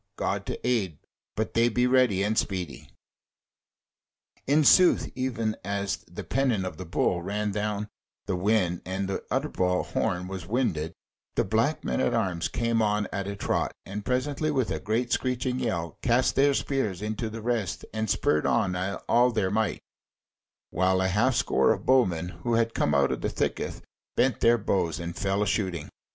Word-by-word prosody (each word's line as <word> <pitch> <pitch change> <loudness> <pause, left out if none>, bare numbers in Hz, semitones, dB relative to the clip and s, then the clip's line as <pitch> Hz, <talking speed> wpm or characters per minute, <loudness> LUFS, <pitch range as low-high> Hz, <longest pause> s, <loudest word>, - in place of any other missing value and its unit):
God - - -2
to - - -4
aid! 100 - 0 0.4
but 110 +1 -2
they 115 +1 +4
be 125 +2 +1
ready 125 -7 +3
and 105 +2 0
speedy!" 90 -8 -2 1.6
In 150 +3 +4
sooth 180 +4 +5
even 115 -4 -1
as 100 +1 -2
the - - -7
pennon 125 -8 0
of 85 -4 -5
the 95 - -7
Bull 85 +1 +1
ran 105 +3 -2
down 105 0 -2 0.4
the 95 - -1
wind 90 -2 +1
and 95 +1 -3
the 95 - -3
Utterbol 95 -10 0
horn 90 +1 -1
was 95 -2 -6
winded, 90 -9 -1 0.4
the - - +3
Black 115 +10 0
men - - -1
at 120 - +1
arms 95 -7 0
came 115 -1 0
on 105 -1 +1
at 100 -1 -2
a 100 - -3
trot, 100 - -1
and 100 +2 -5
presently 140 +5 -1
with 130 -6 0
a - - -1
great 115 +3 -1
screeching 125 0 -1
yell 85 -10 -2
cast 125 +1 +2
their 140 +1 +4
spears 110 -11 -1
into 110 +1 -3
the 110 0 -7
rest, 115 -6 -1
and 110 -1 -2
spurred 75 -5 +2
on 90 - +1 0.3
all 120 +1 +5
they 105 -5 0
might, 105 -1 -1 0.9
while 95 +1 +2
a 95 0 +1
half 120 +7 +2
score - - +3
of - - -2
bowmen 90 -10 +3
who 120 -1 0
had 115 0 +1
come 75 - +1
out 70 -1 +3
of - - -3
the - - 0
thicket - - -2 0.3
bent 130 -3 +2
their 120 +1 +5
bows 90 -7 0
and 85 0 -5
fell 100 +1 0
a - - -1
shooting. 95 -6 -1
105 Hz, 175 wpm, -27 LUFS, 95-120 Hz, 1.6 s, sooth